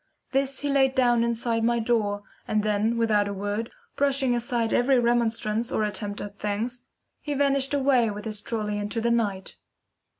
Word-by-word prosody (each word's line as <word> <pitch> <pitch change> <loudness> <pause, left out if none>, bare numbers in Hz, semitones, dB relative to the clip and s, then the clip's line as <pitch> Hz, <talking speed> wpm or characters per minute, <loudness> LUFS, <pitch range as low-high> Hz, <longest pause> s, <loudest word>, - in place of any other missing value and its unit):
This 270 0 0
he 290 - -1
laid 270 -1 +3
down 240 -2 +3
inside 235 -1 0
my 235 +1 +2
door, 220 -3 0 0.2
and 215 -1 +1
then 215 +2 +1
without 215 -3 +2
a 200 - -4
word, 205 +3 -3 0.3
brushing 275 -2 +1
aside 240 -1 -1
every 260 +2 +3
remonstrance 235 -2 +1
or 215 - 0
attempt 205 -1 -3
at 205 0 -8
thanks, 230 +4 -3 0.3
he 295 -1 -4
vanished 275 0 +2
away 265 -4 +3
with 210 +1 -6
his 215 -2 -4
trolly 210 -2 -3
into 205 +2 -3
the 235 +1 +1
night. 205 -5 -1
230 Hz, 170 wpm, -26 LUFS, 210-250 Hz, 0.3 s, laid